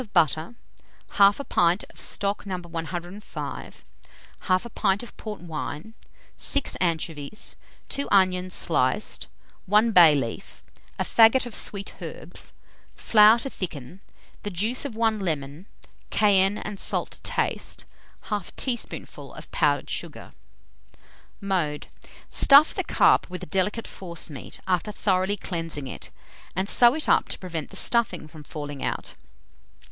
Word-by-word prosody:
butter, 160 - +2 0.6
1/2 200 +7 +5
pint 175 +3 +2
of - - -17
stock 200 0 -1
No. 185 -2 -2
105, 175 +3 -7 0.6
1/2 185 +5 0
pint 200 +1 +1
of 240 - -11
port 210 -4 -7
wine, 160 +3 -6 0.4
6 280 -1 0
anchovies, 165 +2 -2 0.3
2 280 - -2
onions 185 -2 +3
sliced, 145 +4 0 0.4
1 210 +4 +4
bay 170 -6 +8
leaf, 120 -5 -5 0.3
a - - 0
faggot 230 +3 +5
of 240 - -8
sweet 200 -1 -4
herbs, - - -6 0.4
flour 215 +1 +6
to 255 +3 -5
thicken, 175 0 -7 0.4
the 205 - -4
juice 215 +9 -1
of 260 -6 -5
1 225 -1 +1
lemon; 155 -1 -3 0.4
cayenne 200 -1 +4
and 205 -2 -6
salt - - +1
to - - -9
taste; - - -2 0.5
1/2 205 -4 -3
teaspoonful 245 -3 -3
of - - -11
powdered - - +1
sugar. - - -5 1.1
Mode. 175 -7 -1 0.4
Stuff 285 +3 +6
the - - -1
carp - - +3
with 180 -1 -6
a - - -4
delicate 195 +7 -1
forcemeat, 170 -6 -7
after 185 +2 0
thoroughly 195 -1 +1
cleansing 165 -6 -4
it, 130 - -7 0.5
and 190 +2 -1
sew 240 +4 +7
it 310 - -1
up - - +3
to - - -1
prevent 165 -5 -5
the - - -12
stuffing 210 -10 0
from 155 -1 -13
falling 145 -2 -6
out. - - -3
190 Hz, 130 wpm, -25 LUFS, 165-215 Hz, 1.1 s, bay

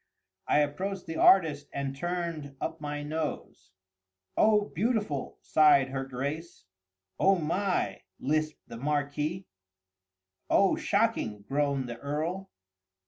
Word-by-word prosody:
I 150 - +4
approached 185 +6 -2
the 160 -1 -5
artist 155 -6 +5
and 140 -1 -3
turned 170 -3 -3
up 160 -1 -4
my 145 0 -4
nose. 155 +1 -4 0.7
"Oh, 215 -1 +5
beautiful!" 205 - -1
sighed 150 -4 +5
her 135 0 -3
Grace. 140 - -5 0.5
"Oh 195 +1 +5
my!" 180 +4 -1 0.2
lisped 155 +2 -1
the - - -8
Marquis. 150 +6 -1 1.0
"Oh, 195 - +4
shocking!" 200 - 0
groaned 140 -2 0
the 120 -1 -7
Earl. 165 +7 -3
150 Hz, 110 wpm, -29 LUFS, 140-180 Hz, 1.0 s, artist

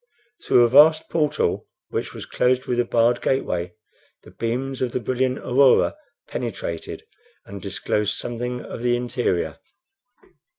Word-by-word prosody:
Through 120 - +5
a - - +5
vast 150 +5 +6
portal, 150 -2 0 0.2
which - - -3
was - - -8
closed 130 +1 +1
with 120 -1 -1
a 120 - +2
barred 120 +1 +2
gateway, 90 -9 -1 0.5
the - - -15
beams 130 +3 -3
of 125 -2 -1
the - - 0
brilliant 130 +2 -1
aurora 130 - +3 0.3
penetrated 100 -8 -5 0.4
and 100 -1 -9
disclosed 100 +2 -1
something 125 +1 -4
of - - -7
the 120 0 +2
interior. 120 -10 -1
120 Hz, 135 wpm, -23 LUFS, 115-130 Hz, 0.5 s, vast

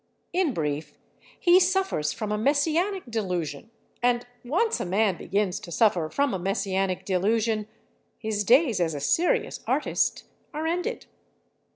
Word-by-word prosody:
In 360 -4 +2
brief, 150 - -3 0.4
he 355 0 +6
suffers 375 - +1
from 215 -2 -4
a 210 - 0
messianic 320 - +1
delusion—and 220 +4 -3 0.2
once 365 - +1
a - - -1
man 195 +1 +2
begins 200 +1 -1
to 175 - -10
suffer 180 -7 +2
from 280 - 0
a 190 - -2
messianic 195 0 -1
delusion 215 +3 +1 0.5
his 215 -2 -2
days 250 - +4
as 165 -3 0
a - - -3
serious 360 - +1
artist - - 0 0.3
are 310 +1 -2
ended. 355 +8 -2
220 Hz, 135 wpm, -26 LUFS, 185-315 Hz, 0.5 s, he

